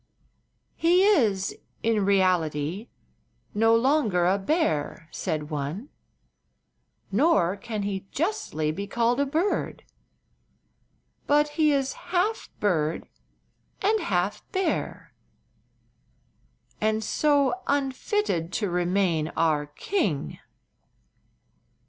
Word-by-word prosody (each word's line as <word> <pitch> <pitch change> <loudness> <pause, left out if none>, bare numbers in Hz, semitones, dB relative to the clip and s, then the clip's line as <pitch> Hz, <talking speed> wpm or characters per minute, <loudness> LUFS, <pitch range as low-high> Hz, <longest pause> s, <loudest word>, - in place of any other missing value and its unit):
"He 350 +3 +4
is, 225 - +2 0.3
in 220 -3 +2
reality, 185 -1 +1 0.7
no 225 +2 +4
longer 230 - +2
a 190 +3 +2
bear," 190 - -1
said 155 0 -3
one; 150 - -4 1.2
"nor 200 - +3
can 210 +1 -5
he 195 -1 -4
justly 315 - -1
be 200 +6 -5
called 235 +4 +1
a 285 - +2
bird. 325 +8 -1 1.4
But 295 +1 +3
he 305 0 +2
is 275 -2 0 0.2
half 375 +5 0
bird 165 -6 0 0.8
and 430 +3 +3
half 190 - -1
bear, 380 -1 -2 1.7
and 220 0 +1
so 290 - +2
unfitted 270 - 0
to 205 -5 -1
remain 175 -2 +1
our 155 -3 +2
king." 150 - -2
210 Hz, 90 wpm, -26 LUFS, 175-295 Hz, 1.7 s, He